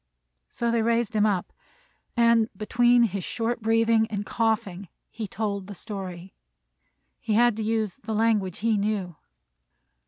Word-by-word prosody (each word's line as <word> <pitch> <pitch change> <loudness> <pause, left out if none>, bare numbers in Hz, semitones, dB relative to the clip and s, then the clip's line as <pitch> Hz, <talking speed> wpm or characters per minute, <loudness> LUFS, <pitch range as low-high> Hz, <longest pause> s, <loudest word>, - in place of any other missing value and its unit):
So 235 -1 -2
they 230 -1 +2
raised 230 0 0
him 215 0 +4
up, 190 -4 -1 0.6
and, 230 -1 +4
between 240 +3 +3
his 200 -4 -1
short 230 +4 -2
breathing 225 0 +3
and 205 -1 -3
coughing, 215 -5 -1 0.2
he 225 -2 -5
told 200 -2 -3
the 205 - -8
story. 190 -3 -7 0.9
He 220 - -2
had 240 +1 +4
to 220 - -2
use 220 -1 -1
the 220 -4 -4
language 210 -5 +1
he 225 -2 +3
knew. 200 -4 -2
220 Hz, 145 wpm, -26 LUFS, 200-230 Hz, 0.9 s, him